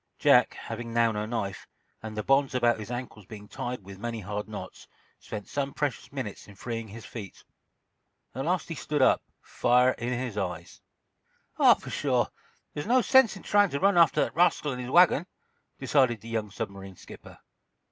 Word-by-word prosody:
Jack, - - +4
having 115 +1 -7
now 115 0 +3
no 105 0 -3
knife, 100 -5 -4 0.3
and 110 -1 -7
the 105 - -2
bonds 135 +2 +2
about 120 -2 +2
his 105 - -7
ankles 120 -5 -7
being 105 -1 -10
tied 120 -1 -5
with 95 0 -11
many 115 +1 -4
hard 105 +2 -5
knots, 95 -3 -9 0.3
spent 105 -1 -7
some 140 -1 -3
precious 145 -4 -3
minutes 130 -8 -6
in 100 - -14
freeing 115 +2 -5
his 110 +2 -10
feet. 105 -6 -9 0.9
At 135 +3 -4
last 175 0 0
he 165 - -4
stood 150 -2 -1
up, - - +4 0.2
fire 125 +1 +3
in 120 +1 -2
his 120 -5 -3
eyes. 90 -3 -5 0.8
"Oh, - - +7
pshaw! - - -1 0.4
There's 145 - -5
no 250 +1 +4
sense 265 -5 +5
in - - -13
trying 205 -1 +3
to 140 - -3
run 200 +3 +3
after 170 -1 +5
that - - -5
rascal 170 -4 +2
and 125 -1 -5
his 125 - -6
wagon," 175 +1 +5 0.5
decided 125 -7 +2
the 115 - -10
young 110 -2 -2
submarine 95 -1 -7
skipper. - - -13
120 Hz, 180 wpm, -27 LUFS, 105-140 Hz, 0.9 s, Oh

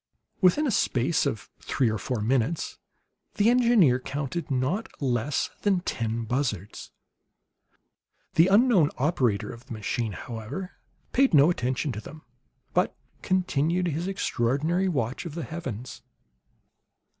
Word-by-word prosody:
Within 195 +12 +4
a 270 - +1
space 140 - +1
of 110 -5 -4
three 130 - 0
or 110 -1 -1
four 120 +2 -3
minutes 130 +7 0 0.6
the 215 +3 +4
engineer 230 - +4
counted 145 +6 -4
not 140 - -1
less 130 0 0
than 195 -3 +2
ten 115 -7 -2
buzzards. 110 -5 -3 1.4
The 165 +2 +5
unknown 200 - +5
operator 130 - +1
of 120 0 -12
the - - -6
machine, 110 0 -2
however, 120 - -6 0.4
paid 265 - +4
no 145 +4 +7
attention 130 -1 -1
to 105 -2 -5
them, 155 +7 -11 0.5
but - - +1 0.3
continued 180 -1 +1
his 165 +4 -2
extraordinary 165 0 0
watch 135 -2 -2
of 155 - -8
the 170 - -3
heavens. 130 -5 -6
140 Hz, 125 wpm, -26 LUFS, 120-180 Hz, 1.4 s, no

